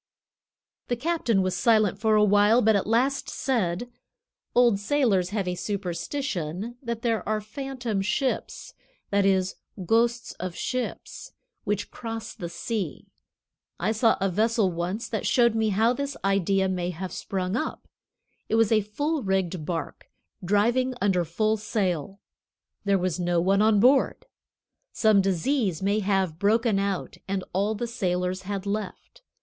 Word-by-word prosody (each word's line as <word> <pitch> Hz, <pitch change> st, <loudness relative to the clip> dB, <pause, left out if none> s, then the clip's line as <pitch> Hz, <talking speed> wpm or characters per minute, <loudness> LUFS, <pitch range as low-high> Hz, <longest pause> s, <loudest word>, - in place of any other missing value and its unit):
The 245 Hz, -, 0 dB
captain 245 Hz, -, +1 dB
was 185 Hz, -1 st, -1 dB
silent 210 Hz, 0 st, +3 dB
for 220 Hz, 0 st, +3 dB
a 210 Hz, -, +5 dB
while, 205 Hz, +4 st, +4 dB
but 220 Hz, 0 st, +4 dB
at 200 Hz, -, 0 dB
last 255 Hz, +5 st, +1 dB
said: 225 Hz, -5 st, -1 dB, 0.7 s
"Old 240 Hz, -5 st, +5 dB
sailors 205 Hz, -6 st, +1 dB
have 200 Hz, -2 st, -2 dB
a 180 Hz, -, 0 dB
superstition 195 Hz, -, -3 dB
that 235 Hz, -2 st, -4 dB
there 230 Hz, -2 st, +1 dB
are 215 Hz, 0 st, +1 dB
phantom 240 Hz, -1 st, -4 dB
ships 250 Hz, +7 st, -2 dB, 0.4 s
(that 200 Hz, -1 st, +3 dB
is, 190 Hz, -1 st, +1 dB, 0.3 s
ghosts 235 Hz, +4 st, +1 dB
of 180 Hz, -1 st, -4 dB
ships) 255 Hz, -1 st, -4 dB, 0.3 s
which 205 Hz, 0 st, -2 dB
cross 225 Hz, -1 st, -6 dB
the 170 Hz, -, -6 dB
sea. 200 Hz, +4 st, -4 dB, 0.7 s
I -, -, +1 dB
saw 225 Hz, +1 st, +3 dB
a 195 Hz, -, +1 dB
vessel 215 Hz, +1 st, +1 dB
once 175 Hz, +6 st, -3 dB
that 220 Hz, -4 st, -2 dB
showed 235 Hz, -2 st, +4 dB
me 220 Hz, -1 st, +1 dB
how 220 Hz, +4 st, +3 dB
this 280 Hz, +1 st, -4 dB
idea 195 Hz, 0 st, +2 dB
may 180 Hz, -2 st, -1 dB
have 180 Hz, +1 st, -5 dB
sprung 190 Hz, 0 st, -3 dB
up. 310 Hz, +7 st, -3 dB, 0.6 s
It -, -, +2 dB
was 225 Hz, -1 st, +3 dB
a 215 Hz, -1 st, +4 dB
full 290 Hz, +10 st, -2 dB
rigged 190 Hz, -6 st, -1 dB
bark, 165 Hz, -3 st, -4 dB, 0.4 s
driving 235 Hz, +7 st, +2 dB
under 190 Hz, -3 st, +2 dB
full 215 Hz, +7 st, 0 dB
sail. 195 Hz, -4 st, -2 dB, 0.7 s
There 200 Hz, -1 st, +3 dB
was 180 Hz, -2 st, -1 dB
no 175 Hz, -1 st, +1 dB
one 195 Hz, +3 st, +3 dB
on 215 Hz, -1 st, +4 dB
board. 260 Hz, +5 st, +3 dB, 0.7 s
Some 215 Hz, -3 st, +4 dB
disease 195 Hz, -, 0 dB
may 200 Hz, +2 st, +2 dB
have 190 Hz, -5 st, 0 dB
broken 215 Hz, +1 st, +2 dB
out, 195 Hz, -2 st, -2 dB
and 195 Hz, -1 st, -2 dB
all 200 Hz, +4 st, +1 dB
the 240 Hz, -, -3 dB
sailors 180 Hz, -4 st, -1 dB
had 200 Hz, -1 st, -3 dB
left. 210 Hz, -, -5 dB
205 Hz, 150 wpm, -26 LUFS, 185-230 Hz, 0.7 s, a